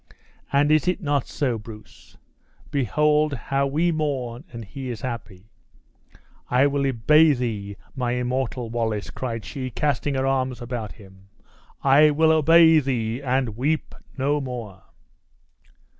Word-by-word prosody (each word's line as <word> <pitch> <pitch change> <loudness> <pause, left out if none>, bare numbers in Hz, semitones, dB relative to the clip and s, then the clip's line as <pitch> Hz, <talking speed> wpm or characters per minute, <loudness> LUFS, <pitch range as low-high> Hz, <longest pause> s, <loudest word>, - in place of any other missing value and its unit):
And 145 +2 +3
is 155 +3 +3
it 180 +1 +1
not 145 - -1
so, 125 -6 -1
Bruce? 105 0 -14 0.5
Behold 150 +3 +2
how 140 +2 -1
we 160 +5 +1
mourn 135 -6 -3
and 115 -2 -8
he 130 +4 -7
is 115 -4 -6
happy! 110 -5 -7 1.0
I 125 +3 +4
will 140 -1 +1
obey 150 +6 +4
thee, 105 -6 -4 0.2
my 125 -2 -1
immortal 125 -1 -2
Wallace!" 110 -3 -2
cried 115 -5 -5
she, 130 +7 -5
casting 145 +2 -1
her 130 0 0
arms 130 -2 0
about 120 -3 -5
him; 95 -2 -17 0.5
"I 140 +3 +6
will 160 +2 +3
obey 160 +1 +6
thee, 125 -3 -2
and 130 -4 -1
weep 145 +6 -1 0.2
no 145 +2 +1
more!" 115 -8 -7
130 Hz, 135 wpm, -23 LUFS, 115-145 Hz, 1.0 s, I